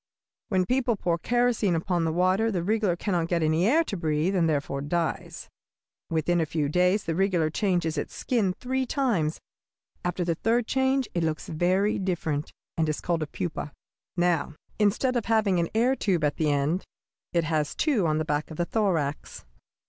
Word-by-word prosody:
"When 185 -4 +2
people 250 +1 +1
pour 170 -4 -1
kerosene 240 -4 +1
upon 170 +1 0
the 160 - +1
water 185 +6 +2
the 180 -4 -1
wriggler 210 -2 +1
cannot 175 -4 -1
get 170 -1 0
any 160 +4 +2
air 315 +8 +4
to 210 - -4
breathe, 160 +2 0
and 170 -3 +3
therefore 140 -2 -1
dies. 165 +3 -3 0.6
Within 165 +2 +1
a - - +1
few 150 -2 -1
days 180 +5 +2
the 165 - -2
wriggler 175 -3 +1
changes 170 -5 0
its - - -6
skin 215 -7 0
three 260 +1 -1
times; 210 - 0 0.6
after 180 0 -1
the 170 - +1
third 225 +7 +1
change 265 +1 +1
it 170 - 0
looks 160 -1 -2
very 185 +6 +1
different, 165 -6 -2 0.3
and 160 -1 +2
is 155 - -1
called 170 -2 -1
a 155 - -2
pupa. 150 -1 -4 0.4
Now, 175 -3 +1 0.2
instead 225 +5 +2
of 235 - 0
having 215 -5 +2
an 170 - 0
air 245 +4 +3
tube 185 -10 0
at 150 0 +1
the 155 -2 +1
end, 145 +6 +1 0.5
it 170 -1 +1
has 155 -2 -1
two 245 - +2
on 155 0 +1
the 155 - -1
back 150 0 -1
of 160 - -9
the 175 - 0
thorax. 165 - -1
175 Hz, 185 wpm, -26 LUFS, 160-210 Hz, 0.6 s, air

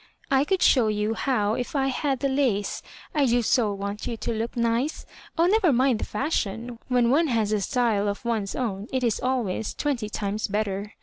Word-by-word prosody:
•' - - -26 0.3
I 270 +2 +3
could 380 +3 +1
show 245 -5 +5
you 210 +1 0
how 220 -3 0
if 245 +5 -4
I 270 -1 +2
had 270 0 -1
the 280 - +2
lace. 260 -7 0 0.3
I 290 -3 +3
do 240 0 +2
so 220 -2 +2
want 200 +1 -4
you 235 - -3
to 235 - -3
look 225 +2 -3
nice. 235 +5 0 0.3
Oh, 335 - +4
never 380 -2 +4
mind 255 -2 +2
the - - -2
fashion. 235 -2 -2
When 245 -2 +3
one 320 +4 +3
has 225 -5 +1
a 210 -1 +1
style 220 -2 +1
of 205 +3 -3
one's 220 -4 -1
own, 210 -5 -3
it 260 -1 -1
is 230 -3 +1
always 240 -5 -1
twehty 250 -8 -1
times 210 0 -2
better. 205 0 -2
235 Hz, 205 wpm, -25 LUFS, 210-265 Hz, 0.3 s, show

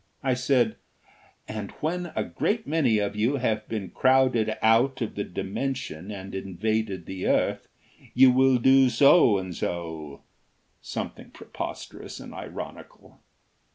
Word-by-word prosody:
I 130 -2 +2
said: 125 -2 +1 0.7
"And 105 -2 -5
when 175 +2 -3
a - - 0
great 225 +2 -1
many 145 -8 +2
of 100 -1 -1
you 115 +7 +1
have 110 -5 -1
been 100 -5 -4
crowded 130 -4 +3
out 120 +5 +3
of 115 -4 -3
the 100 - -3
Dimension 100 - -4
and 100 -2 -7
invaded 95 0 -2
the 95 -1 -4
earth - - +1 0.5
you 130 +1 +7
will 130 0 +4
do 130 +1 +5
so 125 - +5
and 95 -1 -5
so 80 -5 -5 0.3
" - - -43
something - - -5
preposterous - - -8
and - - -10
ironical. - - -9
115 Hz, 135 wpm, -26 LUFS, 100-130 Hz, 0.7 s, you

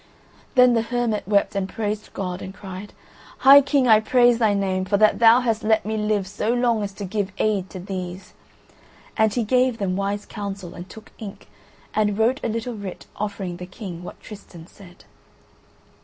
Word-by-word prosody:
Then 250 -1 +6
the 230 - +2
hermit 230 -3 -2
wept 200 -1 +2
and 195 -1 -2
praised 215 -1 -4
God 180 -1 -4
and 190 +1 -8
cried: 190 +1 -9 0.4
"High 275 +1 +8
King, 275 -2 +1
I 220 -2 +7
praise 240 +1 +3
Thy 215 -3 +3
Name, 190 -1 0
for 200 +2 +1
that 215 +1 +4
Thou 230 +2 +7
hast 225 -3 0
let 220 -1 +2
me 220 +1 -2
live 210 -2 0
so 210 +3 -2
long 240 -2 +1
as 200 -1 -3
to 200 0 -6
give 200 0 -2
aid 200 -3 0
to 185 - -8
these!" 185 -1 -7 0.8
And 220 -1 +3
he 235 +2 -1
gave 250 +1 +2
them 190 -3 -1
wise 200 +1 -2
counsel, 200 -3 -6
and 175 +2 -10
took 220 -1 -13
ink, 205 -3 -9 0.4
and 210 -1 +1
wrote 235 +5 +2
a - - 0
little 230 +2 -3
writ 200 -4 -8
offering 200 -4 -4
the 180 0 -8
King 185 -3 -8
what 180 - -10
Tristan 190 -6 -12
said. 180 -1 -17
210 Hz, 185 wpm, -23 LUFS, 195-225 Hz, 0.8 s, High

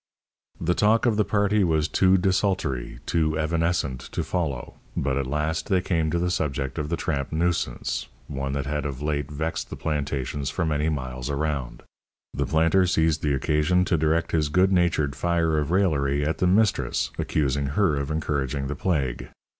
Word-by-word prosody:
The 85 +1 +1
talk 110 +4 +3
of 115 -3 +3
the 105 - +3
party 105 0 +2
was 80 -3 +2
too 95 +1 +4
desultory, 90 -8 0
too 80 -2 +1
evanescent 80 -4 0
to - - -1
follow, 80 -9 -3 0.2
but 65 0 0
at 70 -1 -1
last 75 +6 -2
they 95 -2 +3
came 80 -3 0
to 85 - 0
the 90 +1 0
subject 70 -4 -2
of 75 -1 -3
the 85 - -1
tramp 70 -3 -2
nuisance, 80 -6 -1 0.2
one 70 -1 -3
that 70 -2 -2
had 75 +1 -2
of 70 0 -6
late 75 -2 -1
vexed 80 +3 -3
the - - -6
plantations 70 -2 -2
for 90 - -1
many 75 0 0
miles 65 -3 -4
around. 70 -4 -2 0.5
The - - -1
planter 85 +4 +3
seized 80 -3 +2
the 75 -2 +1
occasion 75 +6 +2
to 85 - +1
direct 80 +1 +1
his 75 -3 +1
good 90 +5 +3
natured 85 -6 +2
fire 80 0 +1
of 75 -1 -2
raillery 75 -7 +1
at 80 +2 -1
the 90 - +3
mistress, 105 +2 +2
accusing 70 -2 0
her 80 +2 +2
of 70 0 -2
encouraging 70 -3 -1
the 75 - -2
plague. 70 -7 -1
75 Hz, 180 wpm, -25 LUFS, 70-85 Hz, 0.5 s, too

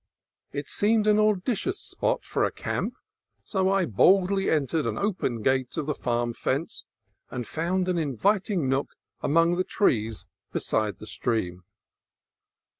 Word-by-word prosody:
It 145 0 -4
seemed 215 +1 +2
an 210 0 +4
auspicious 215 - +1
spot - - -1
for - - 0
a - - +1
camp, - - -3 0.5
so 190 -2 +1
I 195 -2 +3
boldly 190 - +3
entered 150 0 +1
an - - -2
open 170 - -1
gate 130 +2 +1
of 155 - -1
the 150 - 0
farm 120 -3 -1
fence, 140 +7 -2 0.4
and 125 -2 -5
found 180 +3 -1
an 180 -2 +1
inviting 180 - +1
nook 135 +2 -1 0.3
among 165 +3 +3
the 185 - +2
trees 110 - 0 0.3
beside 110 -2 0
the - - -10
stream. 95 -4 -2
160 Hz, 140 wpm, -26 LUFS, 120-195 Hz, 0.5 s, an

